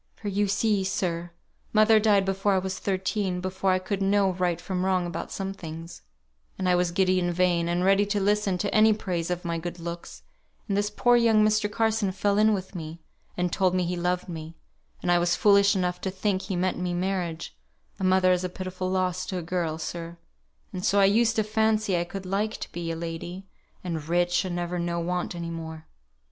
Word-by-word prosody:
For 210 Hz, -, -5 dB
you 205 Hz, +1 st, +1 dB
see, 205 Hz, 0 st, +1 dB
sir, 175 Hz, -2 st, -2 dB, 0.4 s
mother 215 Hz, 0 st, +6 dB
died 205 Hz, -2 st, +3 dB
before 195 Hz, +1 st, +1 dB
I -, -, +3 dB
was 190 Hz, 0 st, -3 dB
thirteen, 190 Hz, -1 st, -1 dB
before 185 Hz, +1 st, -1 dB
I 185 Hz, -, +4 dB
could 195 Hz, +2 st, -3 dB
know 195 Hz, 0 st, +3 dB
right 175 Hz, -2 st, 0 dB
from 185 Hz, 0 st, -3 dB
wrong 185 Hz, -1 st, +1 dB
about 170 Hz, -1 st, -5 dB
some 195 Hz, 0 st, -4 dB
things; 165 Hz, -2 st, -9 dB, 0.6 s
and 185 Hz, -, -1 dB
I 180 Hz, -, +4 dB
was 180 Hz, 0 st, +2 dB
giddy 185 Hz, +1 st, +2 dB
and 175 Hz, -1 st, 0 dB
vain, 175 Hz, -1 st, +1 dB
and 175 Hz, +1 st, 0 dB
ready 195 Hz, +1 st, +4 dB
to 205 Hz, 0 st, 0 dB
listen 200 Hz, -1 st, +1 dB
to 200 Hz, +3 st, -2 dB
any 215 Hz, 0 st, +6 dB
praise 180 Hz, -5 st, -3 dB
of 180 Hz, 0 st, -3 dB
my 170 Hz, -1 st, -1 dB
good 175 Hz, +1 st, -6 dB
looks; 170 Hz, 0 st, -7 dB, 0.4 s
and 200 Hz, -, 0 dB
this 205 Hz, +1 st, +1 dB
poor 245 Hz, +3 st, +3 dB
young 225 Hz, -2 st, +4 dB
Mr. 215 Hz, -1 st, +1 dB
Carson 220 Hz, -2 st, +1 dB
fell 200 Hz, +2 st, +1 dB
in 215 Hz, +1 st, +5 dB
with 190 Hz, -2 st, -3 dB
me, 165 Hz, -2 st, -7 dB, 0.4 s
and 180 Hz, -1 st, -1 dB
told 185 Hz, -1 st, +2 dB
me 185 Hz, -, +2 dB
he 180 Hz, +1 st, -2 dB
loved 180 Hz, +1 st, -1 dB
me; 160 Hz, -1 st, -7 dB, 0.5 s
and 175 Hz, -, +1 dB
I 175 Hz, -, +5 dB
was 175 Hz, 0 st, +2 dB
foolish 200 Hz, +1 st, +5 dB
enough 180 Hz, -1 st, -1 dB
to 190 Hz, -, -2 dB
think 190 Hz, 0 st, -1 dB
he 195 Hz, -, -4 dB
meant 180 Hz, +1 st, 0 dB
me 180 Hz, -1 st, -2 dB
marriage: 175 Hz, -, -3 dB, 0.4 s
a -, -, -4 dB
mother 185 Hz, 0 st, +4 dB
is 180 Hz, 0 st, +1 dB
a 185 Hz, -, -2 dB
pitiful 185 Hz, 0 st, -4 dB
loss 185 Hz, -1 st, 0 dB
to 185 Hz, -, -3 dB
a 175 Hz, -, -4 dB
girl, 165 Hz, -2 st, -2 dB
sir; 170 Hz, +1 st, -6 dB, 0.6 s
and 180 Hz, -1 st, -5 dB
so 200 Hz, -, +3 dB
I 195 Hz, -, +6 dB
used 225 Hz, +3 st, +3 dB
to 220 Hz, -, +2 dB
fancy 215 Hz, -2 st, +1 dB
I 175 Hz, 0 st, 0 dB
could 190 Hz, +2 st, -7 dB
like 200 Hz, +3 st, -1 dB
to -, -, -7 dB
be 170 Hz, -1 st, -4 dB
a 165 Hz, -, -2 dB
lady, 170 Hz, +3 st, -6 dB, 0.4 s
and 165 Hz, -4 st, -3 dB
rich, 175 Hz, +2 st, +2 dB
and 180 Hz, -2 st, -3 dB
never 175 Hz, 0 st, -2 dB
know 170 Hz, 0 st, -1 dB
want 180 Hz, +1 st, -2 dB
any 170 Hz, -1 st, -5 dB
more. 160 Hz, -1 st, -7 dB
185 Hz, 215 wpm, -26 LUFS, 175-200 Hz, 0.6 s, mother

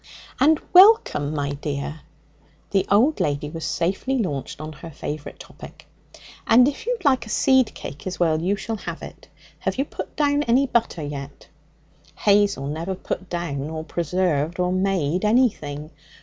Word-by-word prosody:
'And 305 Hz, +3 st, +4 dB
welcome, 365 Hz, -, +6 dB
my 145 Hz, -2 st, -2 dB
dear.' 145 Hz, +1 st, -4 dB, 0.7 s
The 195 Hz, -2 st, +1 dB
old 245 Hz, +10 st, +3 dB
lady 145 Hz, 0 st, -1 dB
was 165 Hz, 0 st, -5 dB
safely 195 Hz, +10 st, -1 dB
launched 145 Hz, -, -3 dB
on 155 Hz, +1 st, -7 dB
her 165 Hz, +3 st, -10 dB
favourite 150 Hz, -1 st, -6 dB
topic. -, -, -13 dB, 0.6 s
'And 245 Hz, +2 st, +6 dB
if 290 Hz, +9 st, -4 dB
you'd 485 Hz, -8 st, -2 dB
like 260 Hz, -5 st, +3 dB
a -, -, -9 dB
seed 260 Hz, +2 st, +3 dB
cake 145 Hz, +6 st, -8 dB
as 185 Hz, -, -5 dB
well, 160 Hz, -2 st, +2 dB
you 190 Hz, +4 st, +1 dB
shall 225 Hz, +2 st, -4 dB
have -, -, -7 dB
it. -, -, -11 dB, 0.3 s
Have -, -, -2 dB
you 275 Hz, -, +1 dB
put -, -, -8 dB
down 290 Hz, -1 st, +2 dB
any 265 Hz, 0 st, +3 dB
butter 230 Hz, -, 0 dB
yet?' 140 Hz, -1 st, -8 dB, 0.7 s
Hazel 200 Hz, -8 st, +2 dB
never 165 Hz, +6 st, -3 dB
put 185 Hz, 0 st, -5 dB
down 155 Hz, -5 st, -3 dB
or 160 Hz, 0 st, -5 dB
preserved 170 Hz, -1 st, -1 dB
or 180 Hz, 0 st, +1 dB
made 185 Hz, -3 st, 0 dB
anything. 200 Hz, -, +1 dB
180 Hz, 160 wpm, -23 LUFS, 150-235 Hz, 0.7 s, welcome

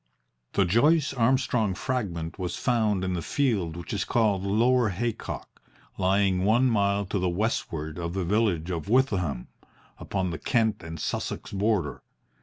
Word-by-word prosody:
The 100 Hz, -, +3 dB
Joyce 140 Hz, -, +3 dB
Armstrong 120 Hz, -5 st, +1 dB
Fragment 100 Hz, -10 st, -3 dB
was 90 Hz, -1 st, -3 dB
found 110 Hz, -6 st, +1 dB
in 95 Hz, -1 st, -1 dB
the 90 Hz, -, -2 dB
field 100 Hz, -, 0 dB
which 85 Hz, -, -6 dB
is 100 Hz, -, 0 dB
called 110 Hz, -5 st, +1 dB
Lower 115 Hz, +4 st, +3 dB
Haycock, 115 Hz, +5 st, -4 dB, 0.3 s
lying 95 Hz, 0 st, +2 dB
one 120 Hz, +5 st, +3 dB
mile 100 Hz, -1 st, +1 dB
to 100 Hz, +1 st, -2 dB
the 90 Hz, 0 st, +1 dB
westward 85 Hz, -5 st, -2 dB
of 85 Hz, +1 st, -4 dB
the 95 Hz, -2 st, -1 dB
village 95 Hz, -4 st, +1 dB
of 85 Hz, -2 st, -4 dB
Withyham, 95 Hz, -, +1 dB, 0.5 s
upon 95 Hz, -2 st, -2 dB
the 80 Hz, -, -5 dB
Kent 115 Hz, -4 st, +1 dB
and 80 Hz, -1 st, -7 dB
Sussex -, -, -3 dB
border. 100 Hz, -, 0 dB
100 Hz, 150 wpm, -27 LUFS, 90-115 Hz, 0.5 s, The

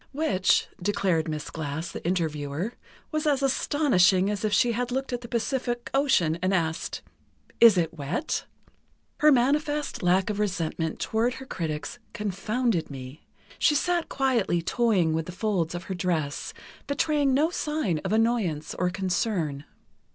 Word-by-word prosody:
Which, 235 Hz, -11 st, +2 dB
declared 180 Hz, -4 st, +1 dB
Miss 155 Hz, -1 st, -4 dB
Glass, 160 Hz, +1 st, -4 dB
the -, -, -7 dB
interviewer, 160 Hz, +2 st, -2 dB, 0.4 s
was 310 Hz, 0 st, -1 dB
as 280 Hz, -2 st, +2 dB
astonishing 205 Hz, -, +3 dB
as 205 Hz, 0 st, -3 dB
if 215 Hz, -, +1 dB
she 240 Hz, +3 st, +3 dB
had 245 Hz, +1 st, -1 dB
looked 265 Hz, 0 st, -2 dB
at 245 Hz, -, -2 dB
the 235 Hz, -, -8 dB
Pacific 240 Hz, +1 st, -2 dB
Ocean 180 Hz, -, +2 dB
and 185 Hz, +1 st, +2 dB
asked: 160 Hz, -2 st, -2 dB, 0.6 s
"Is 230 Hz, -5 st, +8 dB
it 165 Hz, -1 st, +1 dB
wet?" 165 Hz, -, -3 dB, 0.7 s
"Her 305 Hz, 0 st, +6 dB
manifest 290 Hz, +3 st, +1 dB
lack 185 Hz, +3 st, +2 dB
of 205 Hz, -, -4 dB
resentment 165 Hz, -5 st, -2 dB
toward 235 Hz, +3 st, 0 dB
her 265 Hz, -, -9 dB
critics 160 Hz, -, -4 dB
confounded 210 Hz, -1 st, -1 dB
me.... 135 Hz, +1 st, -9 dB, 0.3 s
She 295 Hz, -, +4 dB
sat 345 Hz, +3 st, +1 dB
quietly 250 Hz, -10 st, +1 dB
toying 195 Hz, -6 st, +2 dB
with 160 Hz, 0 st, -2 dB
the -, -, -5 dB
folds 180 Hz, -4 st, -1 dB
of 175 Hz, -, -5 dB
her 190 Hz, -, -5 dB
dress, 165 Hz, -6 st, -2 dB, 0.4 s
betraying 285 Hz, -1 st, +2 dB
no 310 Hz, +5 st, +2 dB
sign 300 Hz, -, -1 dB
of -, -, -4 dB
annoyance 220 Hz, -9 st, +1 dB
or 180 Hz, 0 st, 0 dB
concern." 180 Hz, -6 st, -1 dB
200 Hz, 150 wpm, -26 LUFS, 165-250 Hz, 0.7 s, Is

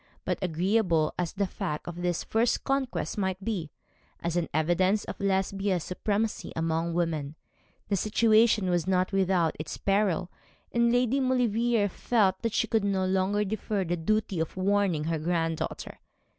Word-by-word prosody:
But -, -, -1 dB
agreeable 180 Hz, -2 st, +1 dB
as 175 Hz, -2 st, -1 dB
the 200 Hz, 0 st, 0 dB
fact 185 Hz, -5 st, -4 dB
of 175 Hz, -1 st, -6 dB
this 175 Hz, -1 st, -1 dB
first 225 Hz, +2 st, +1 dB
conquest 270 Hz, -5 st, -1 dB
might 190 Hz, 0 st, -2 dB
be, 185 Hz, -9 st, -2 dB, 0.5 s
as 170 Hz, 0 st, -2 dB
an 175 Hz, -2 st, 0 dB
evidence 175 Hz, +6 st, +2 dB
of -, -, -7 dB
Lesbia's 195 Hz, -2 st, 0 dB
supremacy 210 Hz, +4 st, -2 dB
among 165 Hz, +1 st, -1 dB
women, 155 Hz, -4 st, -1 dB, 0.5 s
the 200 Hz, -, +1 dB
situation 215 Hz, -1 st, +3 dB
was 175 Hz, -1 st, 0 dB
not 185 Hz, 0 st, +1 dB
without 185 Hz, -4 st, +2 dB
its 155 Hz, -1 st, -5 dB
peril; 195 Hz, -3 st, +1 dB, 0.4 s
and 235 Hz, 0 st, +3 dB
Lady 245 Hz, +2 st, +2 dB
Maulevrier 240 Hz, -4 st, +2 dB
felt 195 Hz, -1 st, +1 dB
that 230 Hz, -2 st, -1 dB
she -, -, +2 dB
could 225 Hz, -2 st, 0 dB
no 195 Hz, -2 st, +1 dB
longer 190 Hz, +2 st, +1 dB
defer 205 Hz, 0 st, -2 dB
the 175 Hz, 0 st, -1 dB
duty 195 Hz, +2 st, 0 dB
of 160 Hz, +3 st, -3 dB
warning 190 Hz, -4 st, +1 dB
her 160 Hz, 0 st, -1 dB
granddaughter. 165 Hz, 0 st, -2 dB
190 Hz, 155 wpm, -28 LUFS, 170-215 Hz, 0.5 s, situation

